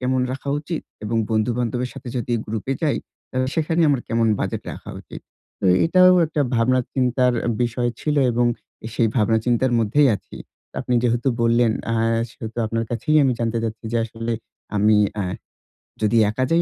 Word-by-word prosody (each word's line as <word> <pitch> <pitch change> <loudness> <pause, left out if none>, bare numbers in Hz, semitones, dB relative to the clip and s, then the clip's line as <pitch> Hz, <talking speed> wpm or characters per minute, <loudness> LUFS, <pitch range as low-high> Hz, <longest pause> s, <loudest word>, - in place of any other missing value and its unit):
কেমন 130 0 +1
রাখা 135 +1 -6
উচিত, 155 +2 -4 0.2
এবং 115 +2 -1
বন্ধু-বান্ধবের 120 +2 0
সাথে 125 - -8
যদি 120 0 -2
গ্রুপ 105 -1 -4
এ - - -1
যাই, 150 -3 +2 0.3
তাহলে 130 0 -1
সেখানেই 160 +1 +2
আমার 135 -3 +1
কেমন 115 0 +2
বাজেট - - -2
রাখা - - -9
উচিত। - - -10 0.4
তো - - +1 0.2
এটাও 185 +2 +6
একটা 155 -1 -2
ভাবনা-চিন্তার 125 +1 +2
আ - - +1
বিষয় 120 0 0
ছিলো, 150 -2 +1
এবং 120 +1 +2 0.5
সেই 115 -2 +2
ভাবনা 110 0 +3
চিন্তার 125 +1 +2
মধ্যেই 130 +6 +3
আছি। - - -14 0.4
আপনি 125 - -1
যেহেতু 120 +2 +1
বললেন, 115 0 +3 0.2
আহ 115 0 +1
সেহেতু 115 +1 -8
আপনার 115 +1 -1
কাছেই 155 +6 +1
আমি 130 - +3
জানতে 115 0 0
চাচ্ছি, 110 +1 -5
যে 120 - +1
আসলে 115 +1 -4 0.4
আমি 105 +1 +4 0.3
এহ 90 -1 -3 0.7
যদি 110 +2 +2
একা 115 +5 -1
যাই, 165 +1 +4
120 Hz, 170 wpm, -22 LUFS, 115-130 Hz, 0.7 s, এটাও